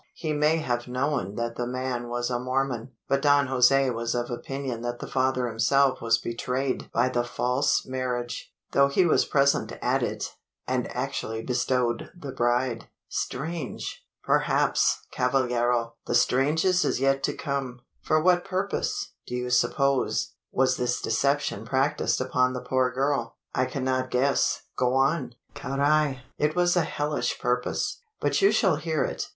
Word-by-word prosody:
He 155 -3 -2
may 150 +2 +3
have 120 -6 -2
known 125 -5 -1
that 115 0 -3
the 120 - -2
man 125 -1 -3
was 120 +1 -2
a 120 - 0
Mormon; 130 -1 -2 0.2
but 135 0 +1
Don 145 -1 +4
Jose 135 +1 +4
was 115 0 -2
of 120 +1 -2
opinion 130 -1 -4
that 120 0 -3
the - - -6
father 130 -1 0
himself 130 +4 +2
was 115 0 +3
betrayed 125 +3 -3
by 120 +2 +2
the 120 -1 0
false 125 +4 0
marriage 125 -2 -3 0.2
though 140 0 +5
he 160 +6 +3
was 165 - +3
present 140 0 +2
at - - +1
it, - - -3 0.3
and 125 -1 -1
actually 125 -4 -3
bestowed 125 -1 0
the 140 -4 -6
bride!" 120 -1 0 0.2
"Strange!" 160 +5 -4 0.2
"Perhaps, - - +2
cavallero! 120 -2 +1
the - - 0
strangest 155 +9 +3
is - - 0
yet 135 0 +2
to - - 0
come. 135 -4 -3 0.2
For 155 - +2
what 175 +2 +3
purpose, 190 +2 -2 0.2
do 125 - -4
you 125 0 -3
suppose, 140 +2 +1 0.2
was 130 0 +2
this 125 0 0
deception 140 -2 0
practised 130 +4 +1
upon 130 0 +1
the 125 - -4
poor 130 -1 +1
girl?" 135 -3 -1 0.2
"I 130 - +2
cannot 130 0 -1
guess 135 +3 +1
go 125 0 +1
on!" 135 -2 +1 0.2
"Carrai! 140 0 +1 0.2
it 150 +1 +1
was 175 0 +3
a 175 - +4
hellish 145 0 -2
purpose; 125 - -1 0.2
but - - +1
you 395 - +6
shall 185 -8 +3
hear 155 -1 -1
it. - - -3
130 Hz, 155 wpm, -26 LUFS, 120-140 Hz, 0.3 s, you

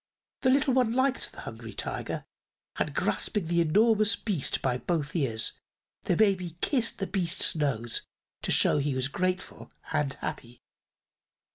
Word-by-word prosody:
The 260 - +3
little 270 0 +3
one 250 -3 +2
liked 260 +1 +1
the - - -10
Hungry - - -8
Tiger - - -4 0.5
and - - -1
grasping 210 -5 0
the 170 +1 +2
enormous 215 +6 +3
beast 190 - 0
by 125 -2 -1
both 155 -2 -2
ears 115 -8 +1 0.4
the 180 - +2
baby 185 -4 +1
kissed 245 - +2
the 195 - -2
beast's 185 -3 +1
nose 125 -7 -1 0.4
to - - -3
show - - +5
he 140 -1 -1
was 130 0 +1
grateful 185 +5 -3 0.2
and 140 -2 0
happy. 120 0 -7
175 Hz, 145 wpm, -28 LUFS, 145-220 Hz, 0.5 s, show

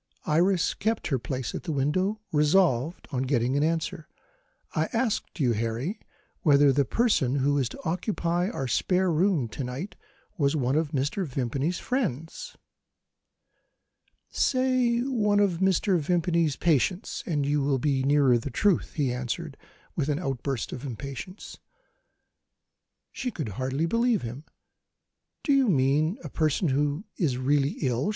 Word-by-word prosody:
Iris 175 +3 +2
kept 220 -1 -1
her 135 -4 +1
place 130 0 -4
at - - -4
the 170 - -4
window, 185 +10 0
resolved 150 -1 +2
on 130 -3 -1
getting 130 -1 +1
an 145 - +2
answer. 160 -1 -2 0.7
"I - - +1
asked 230 -6 -1
you, 130 -5 +3
Harry, 115 - -2 0.4
whether 145 -5 +5
the 140 +1 +2
person 155 - +2
who 140 +1 +2
is 130 -3 0
to - - -10
occupy 175 0 -1
our 135 - -3
spare 180 +8 +1
bedroom, 165 - +2
to 135 - -5
night, 130 +11 -5 0.4
was 140 0 +2
one 130 -2 +1
of 155 -1 +1
Mr. 145 +6 -1
Vimpany's 135 +6 -1
friends?" 240 - -3 1.7
"Say 255 -2 +2
one 215 -6 +1
of 190 -5 +2
Mr. 190 -1 +2
Vimpany's 170 -1 +1
patients 175 - 0
and 150 -5 0
you 145 +1 +1
will 135 0 +1
be 135 0 +1
nearer 135 -3 +4
the 130 - -5
truth," 190 - +1
he 140 -5 0
answered, 130 +5 -4 0.4
with 150 -2 -1
an 145 - +1
outburst 135 -5 -3
of 130 - -6
impatience. 140 - -7 1.5
She 255 - -3
could 155 - -4
hardly 130 - -2
believe 230 +4 +1
him. 125 +6 -7 1.0
"Do 285 - +2
you 270 -2 +4
mean 150 - +2
a - - -6
person 155 +1 +1
who 145 +7 0
is 145 -9 0
really 140 +2 +1
ill?" 130 - 0
150 Hz, 145 wpm, -27 LUFS, 135-185 Hz, 1.7 s, whether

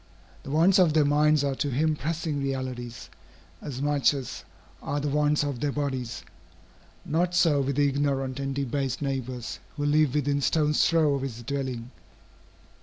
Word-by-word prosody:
The - - -10
wants 170 +7 +4
of 170 -5 +4
their 155 -2 +4
minds 150 0 +3
are 140 -1 0
to 140 +2 -2
him 155 +4 +1
pressing 155 -1 -2
realities, 130 -3 -4 0.5
as 135 -2 -5
much 145 -2 +3
as 135 -3 -6 0.4
are 145 +1 -2
the 145 - -2
wants 150 +1 +2
of 140 -4 -3
their 145 +2 0
bodies. 130 -5 -3 0.8
Not 175 +3 0
so 155 -5 +4
with 135 0 -1
the 145 0 +3
ignorant 135 -2 -1
and 135 -1 -3
debased 135 0 -2
neighbors, 130 -3 -4 0.2
who 145 - -1
live 150 -1 +3
within 145 -1 +1
stone's 150 +1 +2
throw 160 -3 +3
of 140 - -1
his 120 -3 -5
dwelling. 130 -2 -4
140 Hz, 165 wpm, -27 LUFS, 135-150 Hz, 0.8 s, wants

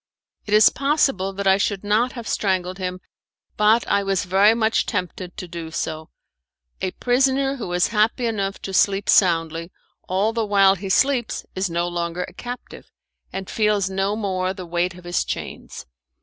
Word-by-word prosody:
It 210 - +2
is 215 - +7
possible 275 -9 +1
that 200 +1 -4
I 190 0 +5
should 200 0 -1
not 220 +5 +1
have 235 -3 -7
strangled 185 -2 -1
him, 185 0 -4 0.5
but 215 +2 +3
I 200 - +2
was 195 0 -1
very 195 +4 +4
much 220 -1 +1
tempted 180 -2 -4
to 180 - -6
do 170 -1 -7
so. 160 -1 -4 0.7
A 190 - 0
prisoner 270 +2 +1
who 220 -8 -5
is 180 0 +2
happy 225 +3 +1
enough 200 -3 -2
to 195 - -5
sleep 195 +1 +2
soundly, 165 -2 +2 0.4
all 200 +4 +1
the 230 -1 0
while 200 -2 +5
he 195 0 -6
sleeps 250 +3 +1
is 190 0 -1
no 170 +1 -1
longer 175 0 -3
a - - -10
captive, 245 0 -9 0.4
and 190 -1 -5
feels 210 -3 +1
no 195 +2 0
more 190 -3 -2
the 185 - -7
weight 175 +1 -1
of 180 - -13
his 175 -1 -1
chains. - - -6
195 Hz, 175 wpm, -22 LUFS, 180-215 Hz, 0.7 s, is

